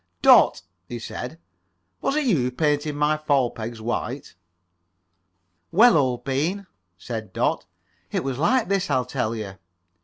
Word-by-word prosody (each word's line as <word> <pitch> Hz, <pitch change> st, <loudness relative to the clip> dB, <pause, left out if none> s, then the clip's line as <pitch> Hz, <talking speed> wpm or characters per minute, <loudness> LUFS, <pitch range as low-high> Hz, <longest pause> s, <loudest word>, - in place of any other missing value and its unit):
"Dot," -, -, +6 dB, 0.2 s
he 120 Hz, -, -6 dB
said, 125 Hz, +5 st, -7 dB, 0.6 s
"was 275 Hz, -, 0 dB
it 305 Hz, -1 st, +1 dB
you 220 Hz, -10 st, +3 dB
who 125 Hz, -1 st, 0 dB
painted 150 Hz, +2 st, 0 dB
my 150 Hz, +1 st, +1 dB
fall 140 Hz, -5 st, +1 dB
pegs 115 Hz, +1 st, -7 dB
white?" 120 Hz, +4 st, -4 dB, 1.4 s
"Well, 230 Hz, +5 st, +6 dB
old 130 Hz, -5 st, +1 dB
bean," 160 Hz, +10 st, -1 dB, 0.3 s
said 110 Hz, 0 st, -6 dB
Dot, -, -, -1 dB, 0.4 s
"it -, -, -1 dB
was 135 Hz, -1 st, -3 dB
like 235 Hz, -, +2 dB
this. 195 Hz, -2 st, 0 dB
I'll 130 Hz, -3 st, +1 dB
tell 125 Hz, -3 st, -2 dB
you." 100 Hz, -4 st, -7 dB
135 Hz, 145 wpm, -24 LUFS, 120-160 Hz, 1.4 s, Dot